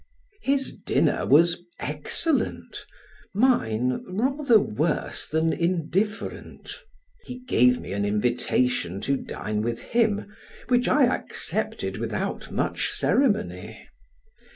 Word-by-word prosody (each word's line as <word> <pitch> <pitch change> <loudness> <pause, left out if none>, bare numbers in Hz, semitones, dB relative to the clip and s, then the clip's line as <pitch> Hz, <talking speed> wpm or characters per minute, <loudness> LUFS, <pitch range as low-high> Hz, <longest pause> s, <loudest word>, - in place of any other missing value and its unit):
His 275 -3 0
dinner - - 0
was 170 +3 +5 0.2
excellent, 155 - -2 0.5
mine 125 - +2
rather 250 +5 +3
worse 105 - -1
than 160 +1 +1
indifferent, 185 +5 -2 0.5
he 250 - -8
gave 125 - +3
me - - -6
an 100 0 -1
invitation 105 -2 0
to 140 - +1
dine 105 -5 -4
with 115 +1 -1
him, 225 -3 +1 0.4
which 245 -1 +3
I 295 - +4
accepted 250 - -2
without - - -3
much - - -1
ceremony. 260 -7 0
170 Hz, 100 wpm, -25 LUFS, -, 0.5 s, was